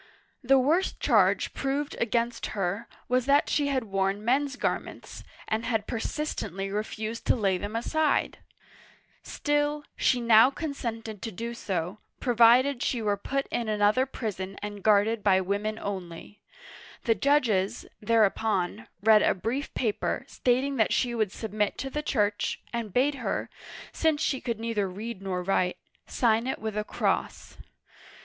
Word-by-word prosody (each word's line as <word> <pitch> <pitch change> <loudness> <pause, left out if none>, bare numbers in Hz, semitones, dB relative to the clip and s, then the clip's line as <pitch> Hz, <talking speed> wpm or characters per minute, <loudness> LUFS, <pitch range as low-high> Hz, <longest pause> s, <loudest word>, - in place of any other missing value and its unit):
The 270 +2 +5
worst 310 +9 +1
charge - - +3
proved 280 +1 -2
against 235 0 0
her 195 +4 -2 0.2
was 250 +1 +1
that 280 +1 +4
she 290 -1 +2
had 270 -3 0
worn 195 0 -1
men's 275 +3 +1
garments, - - -4 0.2
and 220 +1 -1
had 225 -3 -1
persistently 215 - -3
refused 215 +2 -4
to - - +4
lay 195 -6 +1
them 205 +3 -5
aside! 300 +6 0 0.8
Still, 295 0 -1
she 250 - +2
now 230 +1 +6
consented 230 - -5
to 225 - -4
do 230 +5 -5
so, 190 -3 -3 0.2
provided 245 +2 +4
she 245 - 0
were 210 -2 +1
put 275 +7 -2
in 230 -2 -1
another 215 +5 +3
prison 195 -6 -5
and 205 -1 -6
guarded 215 +2 +3
by 190 -2 +4
women 205 +3 -2
only. 190 -1 -7 0.6
The 230 - +3
judges, 220 -5 +1 0.2
tTiereupon, 215 -3 +1 0.2
read 215 -1 +6
a - - +3
brief 245 +9 -3
paper, 220 -5 -1
stating 260 +3 0
that 220 - +2
she 245 -2 +1
would 215 -4 0
submit 210 -1 -2
to 270 - -4
the 300 - -2
Church, 210 -8 0
and 230 -3 -3
bade 265 +7 +2
her - - -2 0.2
— - - -13
since 315 -2 +1
she 270 -4 0
could 235 -3 -3
neither 225 -4 -1
read 210 +2 -6
nor 185 -2 -3
write 180 -1 +1 0.2
— - - -50
sign 230 -1 +1
it 265 - -1
with 220 -1 -5
a 210 - 0
cross. - - -2
225 Hz, 155 wpm, -27 LUFS, 205-255 Hz, 0.8 s, now